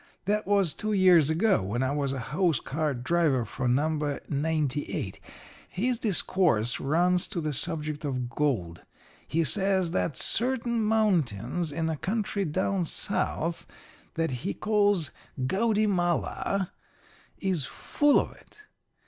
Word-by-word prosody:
That 210 +2 0
was 200 -6 +2
two 215 0 -3
years 180 -6 +5
ago, 195 - +2
when 105 +7 -2
I 130 - 0
was 140 -2 -1
a 135 - -3
hose 150 +6 0
cart 145 -4 -2
driver 150 -5 +2
for 125 +4 -3
No. 145 +2 0
98. 150 -1 -2 0.5
His 240 +5 -1
discourse 175 - +1
runs 175 +5 +2
to - - -4
the 155 -2 -2
subject 155 0 -1
of 130 -4 -2
gold. 115 - -1 0.5
He 165 +2 +1
says 190 +1 +2
that 170 -3 -1
certain 235 -1 0
mountains 175 - +1
in 160 +2 -2
a 160 -1 -2
country 200 +2 -2
down 185 +3 0
South 165 +1 -2 0.5
that 165 -3 0
he 100 - -3
calls 205 -7 +1 0.3
Gaudymala 195 - 0 0.7
is 185 -8 -1
full 290 -1 +2
of - - -3
it. - - -20
165 Hz, 130 wpm, -27 LUFS, 145-195 Hz, 0.7 s, years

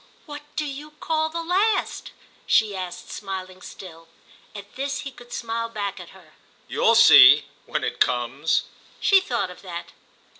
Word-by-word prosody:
"What 295 -1 -8
do 305 - -1
you 295 +2 -8
call 315 -1 -1
the 335 +1 -5
last?" 385 +6 0 0.4
she 215 -3 +3
asked, 180 -1 -7
smiling 185 -2 -7
still. 165 -4 -12 0.5
At 205 +2 -11
this 275 +2 -3
he 275 -2 -7
could 245 -1 -16
smile 230 0 -4
back 200 -3 -4
at 175 - -11
her. 175 -5 -18 0.3
"You'll - - +2
see—when - - +6
it - - -3
comes." 125 +5 +1 0.4
She 390 -1 +5
thought 235 - -2
of 180 - -14
that. 175 -3 -8
215 Hz, 150 wpm, -23 LUFS, 185-290 Hz, 0.5 s, see—when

